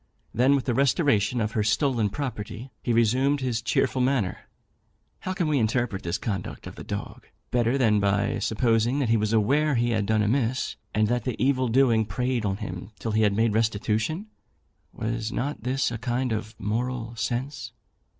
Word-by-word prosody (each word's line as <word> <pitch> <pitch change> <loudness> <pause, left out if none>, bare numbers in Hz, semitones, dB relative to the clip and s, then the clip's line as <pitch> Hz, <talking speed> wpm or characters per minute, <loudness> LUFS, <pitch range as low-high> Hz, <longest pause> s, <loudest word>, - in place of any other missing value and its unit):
Then, 130 +4 +4
with 135 - -1
the 125 - +1
restoration 125 - +2
of 110 -1 0
her 110 - 0
stolen 115 0 +1
property, 120 -1 -5
he 120 - -1
resumed 125 +5 +3
his 125 -4 -1
cheerful 120 +3 +1
manner. 125 -8 0 0.7
How 185 - -3
can 180 -4 -1
we 150 -2 +2
interpret 115 -3 0
this 85 +2 -2
conduct 100 -5 -4
of - - -7
the - - -9
dog, - - -6 0.2
better 120 +2 +2
than 110 -5 +3
by 100 0 +1
supposing 115 +3 +1
that 135 -5 0
he 115 - +4
was 105 0 0
aware 140 +7 +3
he 120 0 +1
had 105 -3 0
done 110 0 +2
amiss, 120 +3 0 0.2
and 110 0 +3
that 120 +2 0
the 125 -4 -2
evil 130 -1 +2
doing 115 -2 +3
preyed 125 +2 -1
on 95 -1 0
him 90 -1 -6
till 115 - -3
he 110 +1 +2
had 105 -2 +3
made 110 0 +2
restitution? 110 - 0 0.7
Was 115 0 -3
not 140 +4 -3
this 130 +2 0
a 115 - -4
kind 125 +1 -1
of 110 0 -3
moral 115 +3 -2
sense? 120 +2 -3
115 Hz, 180 wpm, -26 LUFS, 110-130 Hz, 0.7 s, Then